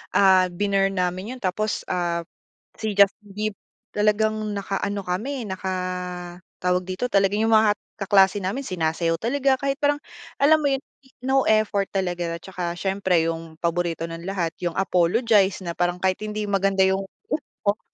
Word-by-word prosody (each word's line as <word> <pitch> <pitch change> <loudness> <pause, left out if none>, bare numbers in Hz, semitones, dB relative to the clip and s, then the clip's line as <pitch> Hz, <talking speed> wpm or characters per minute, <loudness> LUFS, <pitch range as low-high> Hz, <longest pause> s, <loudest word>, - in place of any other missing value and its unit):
ah, 190 -2 +6
binurn 195 +1 0
namin 185 +6 -2
yun - - -12
tapos, 210 +3 -1
ah, 175 -1 -1 0.5
si 220 -1 -3
Justin 200 +1 +4
Bieber 210 +1 -4 0.3
talagang 215 +1 +2 0.2
nakaano 200 0 -2
kami, 235 +7 -2
naka 190 -1 -4 0.9
tawag 180 0 +1
dito? 185 +6 -2
Talagang 200 -2 +2
yung 225 - +4
mga 215 -1 +6 0.2
kaklase 195 0 +3
namin 195 +8 -2
sinasayaw 165 -1 0
talaga 265 +8 +1
kahit 275 0 0
parang 290 -1 +2 0.5
alam 310 +2 +6
mo 290 - +2
yun, 270 - -3 0.4
no 265 0 +2
effort 215 -2 +2
talaga 175 -3 -2
at 170 - -13
tsaka 175 -2 -4
siyempre 190 -2 +1
yung 165 -1 -7
paborito 170 -1 0
ng 165 +1 -7
lahat, 185 -4 -1
yung 175 -2 -2
Apologize 195 +2 +3
na 170 - -4
parang 175 +1 -1
kahit 185 -1 +2
hindi 215 0 -3
maganda 195 -1 +2
yung 190 +1 +2 0.6
tono. 205 +1 +1
195 Hz, 155 wpm, -24 LUFS, 180-215 Hz, 0.9 s, ah